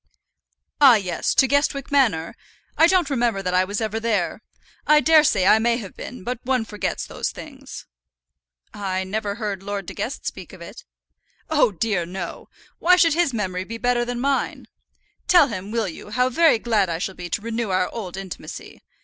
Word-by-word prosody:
"Ah! 265 -4 +9
yes; 185 -5 -1
to 265 - +5
Guestwick 285 0 0
Manor? 225 - +2 0.4
I 325 - +6
don't 360 -3 +3
remember 235 -6 0
that 180 -1 -2
I 185 0 +4
was 205 +2 -3
ever 220 0 -2
there. 215 -6 -1 0.5
I 300 0 +6
daresay 300 - +4
I 215 - +6
may 235 +1 +2
have 200 -6 -8
been, 250 - -9
but 245 +1 -4
one 255 -3 0
forgets 210 -3 -3
those - - -3
things." - - -10 0.9
"I 190 -2 -2
never 200 +1 -3
heard 205 -4 -4
Lord 200 -1 -4
De - - -7
Guest 255 - -5
speak - - -6
of - - -12
it." - - -11 0.7
"Oh, 295 -7 +4
dear, 200 -1 -1
no. 180 -1 -7 0.3
Why 360 +1 +5
should 340 -3 +4
his 340 -2 +2
memory 185 -5 -3
be 230 +4 -7
better 245 +1 +1
than 240 0 -4
mine? 275 +2 -1 0.6
Tell 340 -6 +6
him, 195 -2 -6
will 225 -1 -1
you, 180 +4 -9
how 250 +4 +1
very 320 0 +4
glad 220 -5 +1
I 165 - -2
shall 190 +3 -4
be 175 -1 -8
to - - -2
renew 230 -1 -3
our 185 -1 +1
old 190 -5 -7
intimacy. 190 -4 -8
225 Hz, 185 wpm, -22 LUFS, 190-255 Hz, 0.9 s, Ah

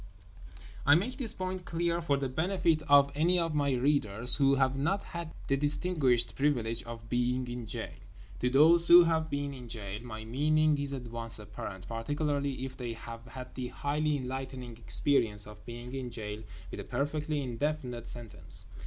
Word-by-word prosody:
I 145 - +6
make 205 +10 -1
this 245 -6 -3
point 185 0 -5
clear 170 0 -1
for 145 -4 +1
the 135 -1 -2
benefit 165 +3 0
of 140 0 +6
any 170 +5 +2
of 165 -2 0
my 145 -2 +1
readers 125 -4 +4
who 140 -1 +4
have 135 -1 +1
not 150 +9 -1
had 170 -2 -7 0.2
the 135 - +2
distinguished 145 -4 +1
privilege 120 -5 0
of 115 -1 -9
being 125 +1 -1
in 120 -1 -6
jail. 110 +1 -6 0.5
To 125 - +1
those 165 +6 +8
who 175 +1 +10
have 160 -1 0
been 140 0 -3
in 125 -3 -10
jail 105 -2 -6
my 110 -2 -8
meaning 155 +5 +2
is 140 -1 -3
at 130 -2 -5
once 115 -1 -1
apparent; 95 -3 -8
particularly 140 +3 -2
if 135 - -8
they 120 -2 -4
have 115 0 -9
had 130 -1 -9
the 130 -1 -5
highly 150 +3 -1
enlightening 130 -2 -6
experience 115 -4 +3
of 105 0 -13
being 120 +1 -8
in 130 -2 -4
jail 105 -2 -6 0.3
with - - -7
a - - -5
perfectly 150 +1 -2
indefinite 125 -1 -3
sentence. 120 -3 -5
135 Hz, 175 wpm, -30 LUFS, 120-150 Hz, 0.5 s, who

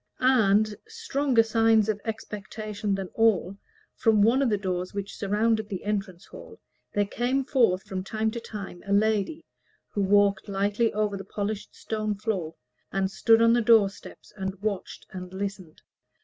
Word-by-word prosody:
And, 215 -5 +3
stronger 290 - +1
sign 225 -1 +3
of 210 -2 -1
expectation 210 -1 -4
than 195 -2 -5
all, 200 -4 +2 0.4
from 220 -3 +3
one 240 +5 +4
of 270 - +2
the 210 - +1
doors 185 -1 -3
that 200 -1 -3
surrounded 215 +2 0
the 190 -4 -5
entrance 200 -3 -3
hall, - - -12 0.3
there 205 0 +1
came 250 +6 -1
forth 230 -10 +2
from 190 -1 -5
time 220 +2 -1
to 235 - -5
time 205 -6 -8
a 200 - 0
lady, 220 +9 +1 0.4
who 205 - -2
walked 200 0 +3
lightly 205 +3 +1
over 210 -1 -1
the 195 - -7
polished 205 +1 -4
stone 215 -1 -3
floor, 195 -6 -3 0.4
and 195 0 0
stood 225 +3 +4
on 230 0 +5
the 240 - +3
door 220 -3 +5
steps - - -14
and 190 -1 -4
watched 205 -3 -4
and 180 -1 -8
listened. 195 -4 -6
210 Hz, 165 wpm, -26 LUFS, 195-225 Hz, 0.4 s, on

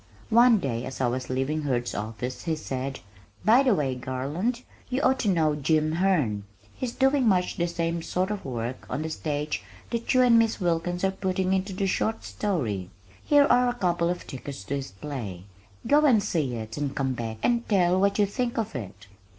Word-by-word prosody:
One 235 0 +7
day 125 - -2
as 130 - -7
I 130 - +2
was 125 +1 -2
leaving 135 +4 -1
Hurd's 125 -4 -1
office 115 +6 -5
he 165 -2 0
said, 135 -3 -4 0.4
"By 230 +5 +7
the 255 -6 +3
way, 140 -6 0
Garland, 145 - -3 0.3
you 260 +1 0
ought 265 +1 +3
to 220 - -1
know 160 -5 +3
Jim 155 +1 +1
Herne. 160 - +1 0.3
He's 250 -2 -4
doing 270 -1 +3
much 180 -3 +2
the 175 - +1
same 170 0 -2
sort 185 +4 -1
of 205 -2 -4
work 120 -1 -5
on 140 +5 -2
the 160 - -4
stage 150 -4 -2 0.3
that 230 0 -1
you 255 - +6
and 235 -2 +6
Miss 225 -1 +1
Wilkins 175 0 -1
are 190 - +3
putting 190 -1 -1
into 190 +1 -1
the 195 +1 -1
short 220 +3 0
story. 115 - -2 0.3
Here 290 -1 +5
are 250 0 +4
a 245 - -2
couple 175 -5 +1
of 180 0 -3
tickets 135 -4 -7
to 135 +8 -3
his 135 - -5
play. 95 -4 -6 0.4
Go 295 +1 +4
and 225 -7 +4
see 145 -10 -1
it 110 +1 -6
and 145 -2 -2
come 135 -1 0
back 115 -2 -4
and 235 -1 +1
tell 185 -3 +3
what 200 +1 +2
you 205 - +4
think 240 +4 -2
of 220 -9 -2
it." 100 -4 -7
165 Hz, 200 wpm, -26 LUFS, 130-205 Hz, 0.4 s, One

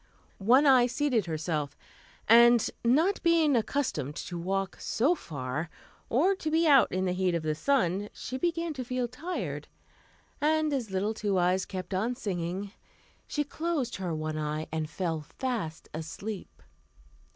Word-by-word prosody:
One 250 +9 +5
Eye 255 -3 +6
seated 250 -6 0
herself, 155 -3 -2 0.5
and, 235 +1 +7 0.2
not 310 +12 +3
being 330 -4 +4
accustomed 225 - -1
to 180 - -6
walk 195 +2 -2
so 270 +10 +2
far, 150 - -4 0.4
or 325 +12 +3
to 315 - -3
be 325 +2 +2
out 275 -3 +6
in 185 +1 0
the 180 - +1
heat 180 -1 +1
of 165 - -2
the 155 -1 0
sun, 205 - +1
she 260 +1 -6
began 335 +1 -1
to 260 -3 -4
feel 250 0 -2
tired, 335 +9 -5 0.7
and 310 0 +2
as 250 -6 -2
little 195 +3 -1
Two 205 -3 -1
Eyes 180 +1 +2
kept 185 0 -5
on 220 +7 0
singing, 190 -2 -3 0.6
she 295 - -1
closed 295 -4 -2
her 180 -4 -3
one 155 0 -3
eye 155 +1 -2
and 155 -1 -2
fell 160 -1 -2
fast 200 - -4
asleep. 180 +6 -7
210 Hz, 150 wpm, -29 LUFS, 170-275 Hz, 0.7 s, and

